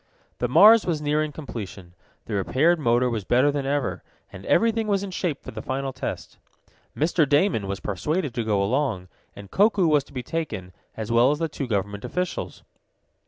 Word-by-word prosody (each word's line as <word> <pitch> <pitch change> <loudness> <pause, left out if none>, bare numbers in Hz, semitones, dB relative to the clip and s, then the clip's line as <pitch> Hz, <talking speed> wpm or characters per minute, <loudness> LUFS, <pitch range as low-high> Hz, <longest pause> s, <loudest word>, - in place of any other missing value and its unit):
The 125 - 0
Mars 215 - +7
was 165 -4 0
nearing 150 +1 0
completion. 105 - -8 0.3
The 110 - -6
repaired 140 - +2
motor 120 -2 +2
was 115 -4 -2
better 130 +7 +3
than 140 -1 -3
ever, 145 0 -1 0.3
and 95 - -10
everything 225 -1 +2
was 200 -2 +1
in 200 - -5
shape 175 -5 -3
for - - -8
the - - -7
final 135 0 -3
test. - - -6 0.6
Mr. 155 -1 +2
Damon 145 - +2
was 100 0 -3
persuaded 145 - -2
to 120 - -2
go 105 -3 +1
along, 110 -5 -1 0.3
and 100 -1 -11
Koku 205 -2 +3
was 150 -3 +3
to - - -20
be 125 -2 -4
taken, 115 - -4 0.3
as 110 0 -4
well 120 +2 +5
as 150 - +1
the 165 +1 -1
two 145 -3 -5
government 100 -2 -2
officials. 180 0 -4
135 Hz, 185 wpm, -24 LUFS, 110-160 Hz, 0.6 s, Mars